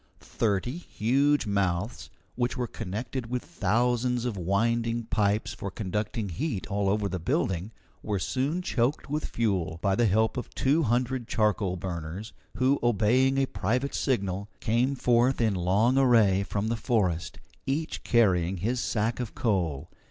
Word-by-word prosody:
Thirty 115 Hz, -, -1 dB
huge 140 Hz, 0 st, +1 dB
mouths, 100 Hz, +1 st, -1 dB, 0.2 s
which 120 Hz, 0 st, -1 dB
were 125 Hz, -, 0 dB
connected 115 Hz, +3 st, -5 dB
with 125 Hz, 0 st, -3 dB
thousands 120 Hz, +4 st, 0 dB
of 120 Hz, -4 st, -2 dB
winding 115 Hz, +5 st, 0 dB
pipes 105 Hz, -1 st, 0 dB
for 100 Hz, -, -5 dB
conducting 105 Hz, +1 st, -3 dB
heat 115 Hz, -, -3 dB
all 100 Hz, -1 st, 0 dB
over 105 Hz, 0 st, +1 dB
the 90 Hz, -1 st, -3 dB
building, 85 Hz, +4 st, -1 dB, 0.3 s
were 105 Hz, -1 st, -2 dB
soon 135 Hz, -, -1 dB
choked 135 Hz, 0 st, -1 dB
with 150 Hz, +1 st, -1 dB
fuel, 95 Hz, -8 st, -1 dB
by 100 Hz, -1 st, +3 dB
the 115 Hz, +4 st, +3 dB
help 110 Hz, +5 st, +2 dB
of 125 Hz, -, -4 dB
two 145 Hz, +5 st, +2 dB
hundred 125 Hz, -1 st, 0 dB
charcoal 105 Hz, -5 st, +1 dB
burners, 90 Hz, +3 st, -5 dB, 0.2 s
who, 130 Hz, +2 st, +2 dB
obeying 120 Hz, +4 st, +3 dB
a 135 Hz, -, +3 dB
private 125 Hz, +4 st, -1 dB
signal, 100 Hz, -6 st, -1 dB
came 120 Hz, +5 st, +1 dB
forth 125 Hz, 0 st, +2 dB
in 110 Hz, -3 st, +2 dB
long 100 Hz, +8 st, +2 dB
array 110 Hz, -7 st, +4 dB
from 100 Hz, +2 st, -2 dB
the 115 Hz, -, 0 dB
forest, 100 Hz, -8 st, 0 dB, 0.3 s
each 150 Hz, +4 st, -2 dB
carrying 95 Hz, -6 st, +3 dB
his 115 Hz, +8 st, -1 dB
sack 115 Hz, 0 st, -1 dB
of 120 Hz, -3 st, -5 dB
coal. 85 Hz, -, 0 dB
110 Hz, 150 wpm, -27 LUFS, 100-125 Hz, 0.3 s, array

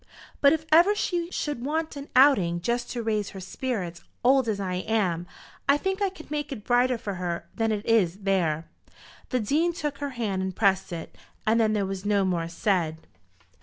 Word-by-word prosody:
But 280 Hz, -, +7 dB
if 315 Hz, 0 st, 0 dB
ever 345 Hz, +6 st, +6 dB
she 345 Hz, -4 st, -1 dB
should 295 Hz, -8 st, -3 dB
want 315 Hz, +3 st, -2 dB
an 280 Hz, 0 st, -8 dB
outing, 235 Hz, -11 st, +5 dB
just 240 Hz, +6 st, -1 dB
to 240 Hz, -2 st, -3 dB
raise 215 Hz, -2 st, 0 dB
her 195 Hz, -, -9 dB
spirits, 185 Hz, -4 st, -4 dB, 0.2 s
old 260 Hz, -1 st, +4 dB
as 205 Hz, -2 st, -1 dB
I 185 Hz, -2 st, -2 dB
am, 185 Hz, -4 st, 0 dB, 0.4 s
I 280 Hz, -, +6 dB
think 385 Hz, +5 st, -2 dB
I 400 Hz, -, +2 dB
could 340 Hz, -5 st, -14 dB
make 295 Hz, -1 st, -2 dB
it 230 Hz, -7 st, -6 dB
brighter 245 Hz, +1 st, +3 dB
for 205 Hz, -3 st, -5 dB
her 175 Hz, -1 st, -3 dB
than 225 Hz, -1 st, 0 dB
it 210 Hz, 0 st, -2 dB
is 200 Hz, -7 st, +3 dB
there." 170 Hz, -5 st, +1 dB, 0.6 s
The 255 Hz, -, +1 dB
Dean 310 Hz, +10 st, +1 dB
took 295 Hz, -4 st, -4 dB
her 285 Hz, -1 st, -2 dB
hand 200 Hz, -5 st, -1 dB
and 190 Hz, -1 st, -3 dB
pressed 195 Hz, -3 st, +2 dB
it, 165 Hz, -2 st, -6 dB, 0.3 s
and 225 Hz, +2 st, +3 dB
then 215 Hz, -1 st, +2 dB
there 205 Hz, -2 st, +1 dB
was 190 Hz, 0 st, -4 dB
no 205 Hz, -1 st, +2 dB
more 170 Hz, -3 st, 0 dB
said. 165 Hz, -2 st, -1 dB
220 Hz, 200 wpm, -26 LUFS, 190-280 Hz, 0.6 s, But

